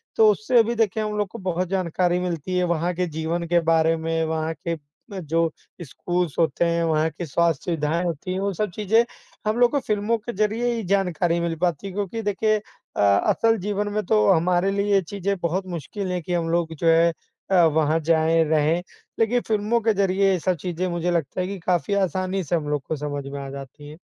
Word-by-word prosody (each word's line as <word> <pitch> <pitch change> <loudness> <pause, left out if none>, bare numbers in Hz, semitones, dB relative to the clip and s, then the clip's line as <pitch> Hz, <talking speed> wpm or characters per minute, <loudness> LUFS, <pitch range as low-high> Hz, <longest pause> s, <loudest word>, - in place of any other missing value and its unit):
तो 220 -1 +6
उससे 230 +4 +3
भी 235 +2 -2
देखिए 220 -1 +1
हम 210 0 -3
लोग 205 - 0
को - - -9
बहुत 185 -1 -1
जानकारी 180 -1 0
मिलती 180 0 -2
है, 180 - +2
वहाँ 175 0 0
के 180 0 0
जीवन 160 +2 -2
के 175 0 +3
बारे 160 0 +3
में, 165 0 -1
वहाँ 160 0 -2
के 165 - 0 0.4
जो 165 +1 +1 0.3
स्कूल्स 175 +2 -2
होते 165 0 +2
हैं, 170 0 +1
वहाँ 160 0 +2
की 175 - -6
स्वास्थ्य 165 0 +1
सुविधाएँ 165 0 0
होती 175 +2 -3
हैं, 185 - -2
वो 200 0 -1
सब 210 +1 -2
चीज़ें 220 +3 +3 0.4
हम 215 +2 +1
लोग 245 -1 +5
को 285 - +1
फ़िल्मों 215 -1 0
के 235 +3 -7
ज़रिए 215 +4 0
ही 225 -2 -3
जानकारी 175 -3 +1
मिल 170 -1 -1
पाती 175 +1 0
है। 190 - -7
क्योंकि 205 +2 -3
देखिए 215 +1 +1
अ, 210 - -8
असल 100 - +3
जीवन 205 +2 -2
में 215 0 0
तो 215 +1 +3
हमारे 180 +2 +2
लिए 200 +1 0
ये 195 - +5
चीज़ें 200 +2 -3
बहुत 180 +3 -1
मुश्किल 180 +3 -5
है 180 -1 -2
कि 175 +2 -4
हम 165 -1 0
लोग 165 -1 0
जो 165 +2 -1
है 165 +1 +5 0.4
अ, 190 - +4
वहाँ 160 0 +2
जाएँ, 165 +1 +3
रहें। 155 +2 +2 0.4
लेकिन 235 +2 +2
फ़िल्मों 215 +2 +1
के 220 0 +2
ज़रिए 195 0 +2
ये 185 - +1
सब 180 +2 0
चीज़ें 180 0 -2
मुझे 175 0 -1
लगता 170 +1 -1
है 180 - -2
कि 200 0 -5
काफ़ी 180 +4 0
आसानी 190 0 0
से 170 +3 -1
हम 150 -3 -2
लोग 145 -2 0
को 160 - -1
समझ 145 -1 -4
में 140 +1 -6
आ 135 - -6
जाती 140 +2 -9
हैं। 155 - -11
175 Hz, 220 wpm, -23 LUFS, 165-200 Hz, 0.4 s, तो